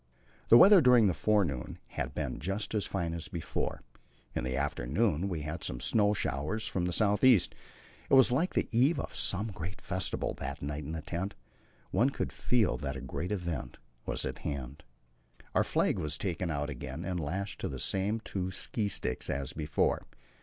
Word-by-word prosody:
The 115 Hz, -, +10 dB
weather 195 Hz, -, +9 dB
during 125 Hz, -4 st, +6 dB
the 95 Hz, -, +3 dB
forenoon 90 Hz, -, 0 dB
had -, -, -4 dB
been -, -, -3 dB
just 95 Hz, +7 st, -2 dB
as 105 Hz, -2 st, 0 dB
fine 85 Hz, -4 st, -2 dB
as 85 Hz, -1 st, -4 dB
before; 85 Hz, -, -3 dB, 0.5 s
in -, -, -2 dB
the 65 Hz, 0 st, -2 dB
afternoon 75 Hz, -, 0 dB
we 85 Hz, -4 st, -3 dB
had 75 Hz, +2 st, -5 dB
some -, -, -3 dB
snow 105 Hz, -, +3 dB
showers 75 Hz, -, -2 dB
from 90 Hz, -2 st, -1 dB
the 90 Hz, -, -1 dB
south 105 Hz, +2 st, +2 dB
east. 125 Hz, -7 st, +5 dB, 0.6 s
It -, -, +6 dB
was 130 Hz, -2 st, +7 dB
like 160 Hz, +9 st, +1 dB
the -, -, +1 dB
eve 130 Hz, +8 st, +3 dB
of -, -, -5 dB
some 105 Hz, +4 st, 0 dB
great 90 Hz, +1 st, -6 dB
festival -, -, -1 dB
that -, -, -5 dB
night 75 Hz, +1 st, -4 dB
in 80 Hz, -, -5 dB
the 80 Hz, -2 st, -5 dB
tent. 90 Hz, +6 st, -3 dB, 0.6 s
One 125 Hz, -, +3 dB
could -, -, -3 dB
feel 120 Hz, -5 st, +1 dB
that 70 Hz, -2 st, -4 dB
a -, -, -7 dB
great 90 Hz, +4 st, -4 dB
event 85 Hz, -10 st, -3 dB, 0.3 s
was -, -, -1 dB
at -, -, -4 dB
hand. 70 Hz, 0 st, -5 dB, 0.7 s
Our -, -, +4 dB
flag -, -, +1 dB
was 75 Hz, 0 st, -2 dB
taken 90 Hz, -2 st, -2 dB
out 75 Hz, -1 st, -2 dB
again 70 Hz, +5 st, -6 dB
and 90 Hz, -1 st, -2 dB
lashed 95 Hz, +6 st, -3 dB
to -, -, -1 dB
the 65 Hz, -, -5 dB
same 100 Hz, -, 0 dB
two 95 Hz, -4 st, -3 dB
ski 100 Hz, +3 st, -1 dB
sticks 65 Hz, -9 st, +1 dB
as 70 Hz, -1 st, -3 dB
before. 75 Hz, -3 st, 0 dB
90 Hz, 190 wpm, -31 LUFS, 75-105 Hz, 0.7 s, The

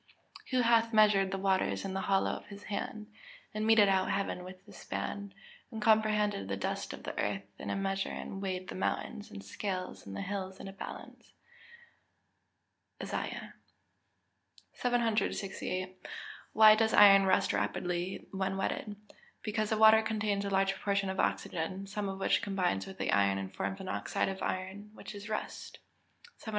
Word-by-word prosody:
[Verse: -, -, -21 dB
"Who 255 Hz, -2 st, +2 dB
hath 230 Hz, -1 st, +3 dB
measured 210 Hz, -3 st, +5 dB
the 195 Hz, -, -2 dB
waters 190 Hz, 0 st, +1 dB
in 195 Hz, -, -3 dB
the 190 Hz, -, -1 dB
hollow 195 Hz, 0 st, +2 dB
of -, -, -7 dB
his 200 Hz, 0 st, -10 dB
hand, 215 Hz, +1 st, -5 dB, 0.4 s
and 215 Hz, +1 st, -1 dB
meted 220 Hz, -2 st, +7 dB
out 190 Hz, -1 st, +2 dB
heaven 195 Hz, -2 st, -1 dB
with 185 Hz, +1 st, -11 dB
the -, -, -14 dB
span, 200 Hz, -1 st, -5 dB, 0.4 s
and 225 Hz, -, -6 dB
comprehended 210 Hz, -, +2 dB
the 100 Hz, 0 st, -2 dB
dust 100 Hz, -, -3 dB
of -, -, -9 dB
the -, -, -5 dB
earth 100 Hz, -1 st, -1 dB, 0.2 s
in -, -, -5 dB
a -, -, 0 dB
measure 195 Hz, 0 st, -1 dB
and 195 Hz, -, -6 dB
weighed 185 Hz, -1 st, -3 dB
the -, -, -5 dB
mountains 210 Hz, +3 st, -3 dB
in 95 Hz, -, -8 dB
scales, 185 Hz, -, -5 dB
and 100 Hz, -, -6 dB
the 100 Hz, -, -3 dB
hills 190 Hz, -1 st, -4 dB
in -, -, -7 dB
a 195 Hz, -, -8 dB
balance?" 195 Hz, -, -9 dB, 1.7 s
ISAIAH -, -, -4 dB, 1.2 s
XL.] -, -, -22 dB
768. 200 Hz, -6 st, -1 dB, 0.5 s
Why 215 Hz, 0 st, +9 dB
does 220 Hz, 0 st, +2 dB
iron 195 Hz, -1 st, +8 dB
rust 190 Hz, -, +3 dB
rapidly 180 Hz, +1 st, -2 dB
when 195 Hz, 0 st, -1 dB
wetted? 205 Hz, +2 st, -2 dB, 0.5 s
Because 215 Hz, -1 st, -1 dB
the 220 Hz, -, +1 dB
water 220 Hz, 0 st, +8 dB
contains 215 Hz, -2 st, -1 dB
a 200 Hz, -, -2 dB
large 195 Hz, 0 st, +2 dB
proportion 200 Hz, -1 st, 0 dB
of 190 Hz, -, -5 dB
oxygen, 185 Hz, +4 st, -1 dB
some 200 Hz, 0 st, -3 dB
of 195 Hz, -, -4 dB
which 195 Hz, -, +2 dB
combines 185 Hz, -, -1 dB
with 95 Hz, -, -9 dB
the -, -, -1 dB
iron 100 Hz, -1 st, +3 dB
and 95 Hz, 0 st, -5 dB
forms 195 Hz, -, -3 dB
an 190 Hz, -, -7 dB
oxide 185 Hz, -, -1 dB
of 190 Hz, 0 st, -5 dB
iron, 190 Hz, +3 st, -4 dB
which -, -, -9 dB
is 205 Hz, +1 st, -8 dB
rust. 215 Hz, -, -5 dB, 0.6 s
769. -, -, -8 dB
195 Hz, 175 wpm, -32 LUFS, 185-215 Hz, 1.7 s, Why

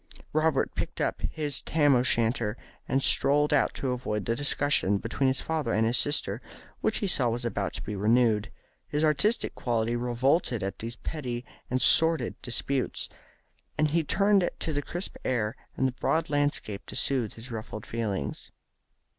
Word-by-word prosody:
Robert 155 Hz, -2 st, +2 dB
picked -, -, -4 dB
up -, -, -1 dB
his 145 Hz, -3 st, -3 dB
Tam 145 Hz, -2 st, +3 dB
o' 125 Hz, -, +4 dB
Shanter 115 Hz, -2 st, +1 dB, 0.3 s
and 135 Hz, 0 st, +1 dB
strolled 145 Hz, +2 st, +3 dB
out 145 Hz, -, +2 dB
to 130 Hz, -, -2 dB
avoid 105 Hz, -5 st, -2 dB
the 115 Hz, -, 0 dB
discussion 145 Hz, -7 st, +2 dB
between 120 Hz, +6 st, -1 dB
his 130 Hz, 0 st, +1 dB
father 155 Hz, -7 st, -1 dB
and 110 Hz, +3 st, +2 dB
sister, 145 Hz, +4 st, +1 dB, 0.4 s
which -, -, +1 dB
he 205 Hz, -, -1 dB
saw 130 Hz, -9 st, +2 dB
was 120 Hz, +1 st, -2 dB
about 100 Hz, -4 st, -2 dB
to -, -, -6 dB
be 105 Hz, -, -4 dB
renewed. 110 Hz, +1 st, +2 dB, 0.4 s
His 150 Hz, +1 st, -1 dB
artistic 155 Hz, -, +2 dB
nature 120 Hz, -1 st, 0 dB
revolted 125 Hz, -, +1 dB
at 100 Hz, -, -4 dB
these 115 Hz, +1 st, -5 dB
petty 125 Hz, -4 st, -5 dB, 0.2 s
and 130 Hz, -, +1 dB
sordid 160 Hz, -2 st, +4 dB
disputes, 130 Hz, +2 st, -1 dB, 0.7 s
and 155 Hz, -1 st, +2 dB
he 165 Hz, +1 st, +2 dB
turned 195 Hz, +2 st, +3 dB
to 160 Hz, -, -3 dB
the 145 Hz, -, 0 dB
crisp 175 Hz, +6 st, -5 dB
air 120 Hz, -2 st, 0 dB, 0.2 s
and 130 Hz, -, +3 dB
the -, -, -1 dB
broad 160 Hz, +6 st, 0 dB
landscape 145 Hz, -8 st, -1 dB
to -, -, -7 dB
soothe 125 Hz, -6 st, 0 dB
his 115 Hz, +3 st, -10 dB
ruffled 110 Hz, -1 st, -6 dB
feelings. 105 Hz, -11 st, -3 dB
130 Hz, 165 wpm, -28 LUFS, 115-145 Hz, 0.7 s, o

